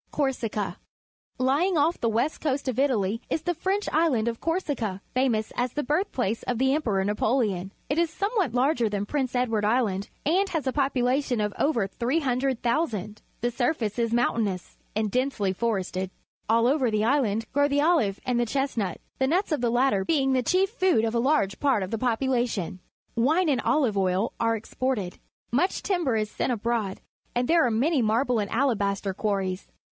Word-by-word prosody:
Corsica. 250 -7 -2 0.3
— - - -47
Lj 265 +4 +2
ing 370 -2 +1
off 315 +4 +2
the 230 - +2
west 235 +8 0
coast 280 -2 -1
of 255 -1 -1
Italy 230 -6 +1
is 320 - -1
the 350 - 0
French 385 +5 -1
island 295 -9 +2
of 230 -1 -3
Corsica, 290 - -2
famous 245 -4 0
as 245 0 -1
the 295 - -1
birthplace 255 - -1
of 245 - -2
the 265 +2 +2
Emperor 215 -11 0
Njigqleon 210 -3 0
I. - - -16 0.2
It 290 +4 0
is 340 -1 +2
somewhat 400 - -1
larger 250 -3 +2
than 205 0 -2
Prince 260 +1 -2
Edward 230 -4 +1
Island 210 -3 +1 0.2
and 375 +6 +2
has 320 -5 -2
a 260 - 0
population 265 -2 +1
of 210 -1 -1
over 260 -9 +2
300,000. 245 - -1 0.2
The 240 +1 0
surface 240 -3 -1
is 230 -1 +1
moimtainous 225 -5 0 0.2
and 215 -1 0
densely 250 -7 0
forested. 190 -3 -2 0.4
AU 230 +1 +4
over 260 -1 +2
the 215 -1 +1
island 225 -5 +1
grow 285 +1 +3
the 285 0 +1
olive 300 - +2
and 245 -1 +1
the 240 - +1
chestnut, 235 -8 -1 0.2
the 265 - +2
nuts 360 +6 +1
of 300 - 0
the 240 - +2
latter 240 -4 +2
being 270 +2 +2
the 255 - +2
chief 375 - +2
food 370 - +2
of 225 - -1
a 235 - +1
large 230 -7 +1
part 265 -8 +2
of 185 - -6
the 225 - -2
population. 240 -6 0 0.4
Wine 310 +9 +2
and 265 -4 +2
olive 260 -9 +2
oil 185 +2 0
are 230 0 +2
exported. 225 -3 -3 0.3
Much 330 +11 +1
timber 345 - 0
is 215 -1 -1
sent - - -1
abroad, 225 -3 -2 0.3
and 245 0 +1
there 335 0 +4
are - - +1
many 260 +6 +2
marble 235 +2 +2
and 205 -1 -2
alabaster 200 -6 0
quarries. 195 -2 -2
245 Hz, 185 wpm, -26 LUFS, 215-285 Hz, 0.4 s, AU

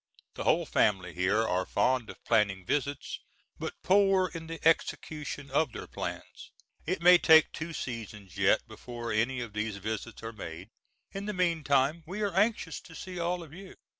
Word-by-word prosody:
The - - -5
whole - - +3
family 95 -4 +1
here 95 +5 +1
are 90 +1 +1
fond 125 +3 +1
of - - -11
planning 100 -5 +2
visits, 140 +4 -2 0.4
but - - -6
poor 195 -1 +4
in 165 -1 -7
the 165 -1 -6
execution 150 -3 -1
of 145 -1 +2
their - - -6
plans. - - -7 0.4
It 175 0 -1
may 180 0 +8
take 160 -1 +7
two 165 +1 -5
seasons 110 - -6
yet 100 +3 +3
before 115 +1 -7
any 120 +4 +1
of 115 -3 -6
these 105 -1 -2
visits 110 +3 -5
are 115 +1 -5
made; 90 -1 -8 0.4
in 195 +1 -5
the 210 - -2
meantime, 160 -4 +2
we 195 +5 -5
are 200 -3 -1
anxious 195 -5 +1
to 160 - -14
see 180 +1 -7
all 175 +1 -1
of 155 -2 -13
you. 190 +2 -11
140 Hz, 175 wpm, -30 LUFS, 110-170 Hz, 0.4 s, may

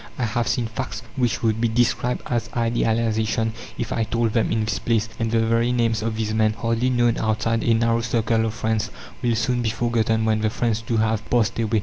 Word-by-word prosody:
I 130 - -2
have 115 +1 -1
seen 120 - 0
facts 125 +2 -5
which 125 -2 0
would 110 -1 +1
be 120 - +3
described 120 +2 0
as 115 -2 -2
"idealization" 115 -1 +1 0.2
if - - -3
I 115 - 0
told 115 0 0
them 115 - +1
in 110 -1 +1
this 105 -1 -1
place; 115 -2 +1
and 115 -1 0
the 115 0 +2
very 115 +2 +2
names 115 -3 +1
of 110 0 -2
these 110 -1 -2
men, 110 0 +2
hardly 115 +3 0
known 120 -2 +2
outside 110 +1 0
a 115 - +3
narrow 115 0 +2
circle 115 -1 +1
of 110 - -4
friends, 110 0 -1 0.3
will 120 -1 +1
soon 120 +2 0
be 115 - 0
forgotten 115 -1 0
when 110 -1 +1
the 110 - +2
friends, 115 -1 -1
too, 115 0 -1
have 110 0 0
passed 115 -2 +1
away. 110 -1 +1
115 Hz, 220 wpm, -23 LUFS, 110-115 Hz, 0.3 s, be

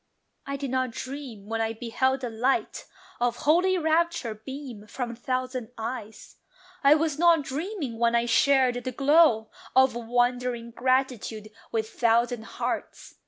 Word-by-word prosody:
I 275 - -2
did 275 -2 -4
not 260 -1 0
dream 255 -4 -7
when 225 +1 -2
I 225 0 -1
beheld 255 +3 0
the 245 -2 -4
light 245 +5 -1 0.3
Of 240 0 +1
holy 360 +5 +4
rapture 320 -6 +1
beam 235 -1 -9
from 240 +1 -4
thousand 255 -1 -3
eyes: 225 -1 -7 0.5
I 280 +2 +7
was 310 -1 -1
not 335 -3 +5
dreaming 285 - -4
when 235 0 +3
I 235 0 +2
shared 250 0 +3
the 255 - -3
glow 275 -4 +4 0.2
Of 265 0 +5
wondering 245 0 -1
gratitude 245 -4 -1 0.2
with 220 -1 -1
thousand 235 0 +1
hearts. - - -5
250 Hz, 140 wpm, -26 LUFS, 230-275 Hz, 0.5 s, I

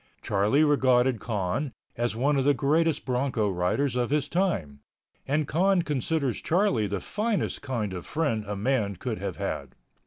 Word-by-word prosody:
Charlie 105 +9 +2
regarded 130 -4 +3
Con 105 +6 -2 0.2
as 120 -1 -1
one 140 +5 +2
of 135 - +2
the 145 +1 +4
greatest 155 +5 +1
bronco 125 -5 0
riders 95 +10 0
of 125 -1 0
his 145 0 +1
time, 150 - -1 0.5
and 145 +1 +1
Con 185 +2 +2
considers 145 -3 -1
Charlie 160 - +2
the 100 0 -2
finest 215 - -2
kind 115 -8 -3
of 90 - -5
friend 140 -9 -1
a 105 - -3
man 105 -2 0
could - - -4
have - - -4
had. - - -4
130 Hz, 160 wpm, -27 LUFS, 105-150 Hz, 0.5 s, the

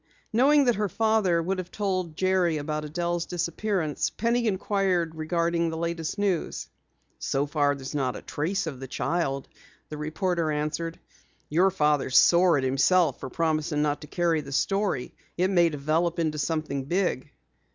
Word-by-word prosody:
Knowing 280 +5 +5
that 245 - +4
her 210 -1 0
father 215 -6 +2
would 185 +2 -1
have 180 -1 -5
told 185 -6 -2
Jerry 185 -3 +2
about 150 +1 -3
Adelle's 170 +2 -2
disappearance, 175 -1 -1
Penny 235 +1 0
inquired 190 -4 0
regarding 170 +1 0
the 160 - -4
latest 170 +1 -3
news. 195 -5 -1 0.5
"So 135 +1 0
far 145 -1 +1
there's 135 0 -7
not 130 -4 -1
a - - -8
trace 180 +6 -2
of 145 -6 -5
the 135 - -7
child," 140 0 -2 0.4
the 150 - -6
reporter 160 +2 -1
answered. 155 +3 -3 0.5
"Your 175 +5 +4
father's 150 -7 +2
sore 175 -2 +6
at 135 - -1
himself 145 +7 +3
for - - -6
promising 155 -2 0
not 145 -1 -1
to 150 - -9
carry 165 -1 +1
the 140 - -10
story. 195 -3 0 0.2
It 185 +2 +2
may 175 -3 +4
develop 160 +4 0
into 155 -2 -1
something 145 -3 -2
big." 170 -4 -1
170 Hz, 160 wpm, -26 LUFS, 150-185 Hz, 0.5 s, sore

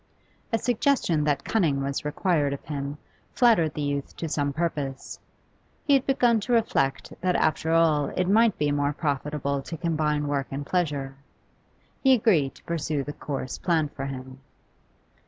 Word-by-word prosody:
A 225 - +2
suggestion 230 - +1
that 145 -2 0
cunning 155 -11 +1
was 140 0 -2
required 150 -1 0
of 140 - -8
him 140 -1 -4 0.4
flattered 215 - +3
the 150 - -2
youth 140 -1 -3
to 165 - -3
some 145 -2 -1
purpose. 145 -4 -3 0.7
He 285 - +4
had 270 -2 +3
begun 245 -4 +3
to 240 +4 -2
reflect 220 -12 +1
that 180 -1 +1
after 160 +1 +1
all 160 -3 +3
it 180 -1 -1
might 220 +1 +4
be 150 -1 +1
more 145 0 0
profitable 140 -1 -2
to 165 +4 -7
combine 150 -3 0
work 140 -1 -1
and 140 +1 -5
pleasure. 145 -6 -1 0.9
He 265 -1 +6
agreed 185 - +2
to - - -18
pursue 155 -3 -2
the 145 - -6
course 135 -4 -5
planned 160 -4 +1
for 135 0 -5
him. 130 -1 -8
150 Hz, 160 wpm, -26 LUFS, 140-180 Hz, 0.9 s, He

